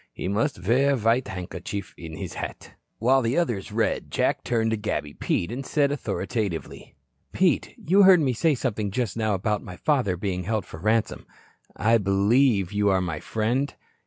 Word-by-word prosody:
He - - -5
must 100 - -1
wear 135 +4 +4
a - - -2
white 115 +3 +2
handkerchief 90 +1 -6
in 80 -2 -9
his - - -6
hat." - - -7 0.3
While 130 +4 +3
the 120 +4 0
others 120 - -1
read, - - -1
Jack - - 0
turned 115 -2 0
to - - +2
Gabby 105 -8 -3
Pete 85 - -1
and 130 +3 -4
said 140 0 +1
authoritatively: 110 - -4 0.4
"Pete, - - +1
you 190 +5 +3
heard 190 -2 +8
me 135 -5 +1
say 150 +6 +2
something 110 -5 -2
just 115 +1 -2
now 110 -2 0
about 105 +2 -1
my 90 -5 -9
father 125 - +1
being 90 -1 -3
held 110 -1 -1
for 80 - -10
ransom. 110 +4 0 0.5
I 115 +2 +3
believe 100 +1 +2
you 105 0 +2
are 95 -1 +3
my 85 -4 -3
friend." 120 - -1
110 Hz, 180 wpm, -25 LUFS, 95-130 Hz, 0.5 s, heard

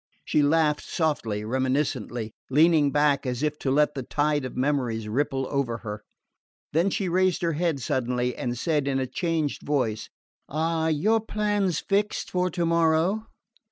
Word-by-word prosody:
She 150 - +2
laughed 150 0 +3
softly, 115 -10 -1
reminiscently, 130 -2 -1 0.2
leaning 150 0 +4
back 145 -2 +2
as 125 +2 -2
if 150 0 -1
to 135 - -2
let 150 +2 +3
the 135 - -4
tide 145 +2 0
of 130 - -7
memories 125 -5 0
ripple 135 +3 -1
over 135 -5 -1
her. 105 0 -5 0.7
Then 170 +5 +3
she 195 0 -1
raised 185 0 +1
her 165 -1 +1
head 160 -2 0
suddenly, 125 0 -1
and 120 0 -3
said 150 +1 0
in 135 -1 +1
a 130 - 0
changed 160 +2 -2
voice: 115 -7 -1 0.4
"Are 160 +2 0
your 210 +9 +2
plans 205 -5 0
fixed 205 +1 -1
for 180 0 +1
tomorrow?" 170 +4 +1
150 Hz, 155 wpm, -26 LUFS, 130-165 Hz, 0.7 s, leaning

